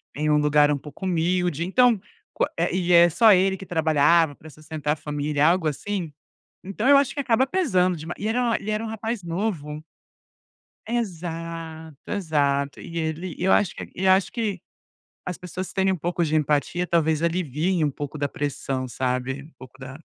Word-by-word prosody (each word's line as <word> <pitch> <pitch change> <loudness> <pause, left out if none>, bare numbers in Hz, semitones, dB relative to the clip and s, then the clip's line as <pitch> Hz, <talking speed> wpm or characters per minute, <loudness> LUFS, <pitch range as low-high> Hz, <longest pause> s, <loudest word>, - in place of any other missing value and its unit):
em 150 +1 -1
um 150 - +4
lugar 150 0 +4
um 145 - +1
pouco 150 +6 -9
humilde, 175 -2 0
então, 225 +2 +3 0.7
e 180 -1 0
é 170 0 +8
só 220 +6 +6
ele 190 0 +3
que 195 - -10
trabalhava 160 -1 +3
pra 155 +2 -14
sustentar 155 0 -3
a - - -4
família, 150 -1 -1
algo 170 -1 +2
assim, 175 +2 -3 0.5
então 200 +5 -4
eu 280 0 +7
acho 280 -2 +1
que 285 - -2
acaba 255 0 +2
pesando 185 - +1
demais, 160 +3 -7
e 215 - 0
era 240 0 +1
ele 215 - -4
era 215 +1 -1
um - - -4
rapaz 225 0 -4
novo. 165 -4 -3 1.1
Exato, 165 -7 -5
exato 145 -7 0
e 170 - -8
ele 160 +2 -3
eu 190 +2 +1
acho 195 - +2
que - - -8
e 190 +1 -1
acho 190 0 +4
que 215 -7 -2 0.7
as 180 - -5
pessoas 180 +1 -6
terem 190 0 +2
um - - -1
pouco 175 +1 -2
de 155 0 -1
empatia 150 +4 0
talvez 160 -2 +1
aliviem 170 +1 0
um 145 - +1
pouco 145 +2 -6
da 145 0 0
pressão, 135 -2 -3
sabe, 130 +2 -2
um 155 +3 -16
pouco 130 +1 -14
da 135 +1 -9
170 Hz, 180 wpm, -24 LUFS, 150-190 Hz, 1.1 s, é